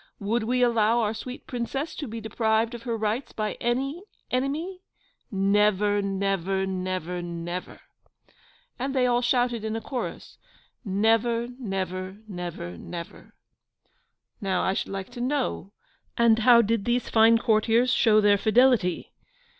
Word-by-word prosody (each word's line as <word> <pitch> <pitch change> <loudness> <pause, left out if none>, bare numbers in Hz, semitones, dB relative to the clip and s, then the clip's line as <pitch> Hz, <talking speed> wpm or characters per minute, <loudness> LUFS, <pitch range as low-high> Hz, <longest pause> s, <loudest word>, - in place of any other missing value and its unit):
Would 220 +3 -1
we 250 +2 +2
allow 230 -1 +3
our 215 -1 0
sweet 250 +3 -8
Princess 270 +5 -3
to 295 - -4
be 225 0 -6
deprived 220 +1 0
of 240 - -7
her 230 -1 -3
rights 220 +4 -2
by 215 -1 -2
any 270 +7 -1 0.3
enemy? 305 +9 -2 0.5
Never, 205 +1 +2
never, 195 -1 -1
never, 185 -2 -3
never!' 175 +1 -6 1.0
And 270 +2 -2
they 255 -1 +3
all 245 0 +2
shouted 245 -2 +1
in 220 0 -2
a - - -1
chorus, 255 -3 -5 0.4
'Never, 225 +3 +1
never, 190 -3 -4
never, 175 - -6
never!' 170 - -9 1.1
Now, 190 -3 0
I 190 - +1
should - - -3
like 195 +3 -5
to 245 -1 -7
know, 255 - -2 0.5
and 230 -1 +4
how 235 0 +6
did 220 -1 0
these 240 +1 0
fine 225 +1 +5
courtiers 230 +2 +2
show 215 -2 +4
their 205 -1 +4
fidelity? 225 -4 +2
220 Hz, 140 wpm, -26 LUFS, 195-240 Hz, 1.1 s, how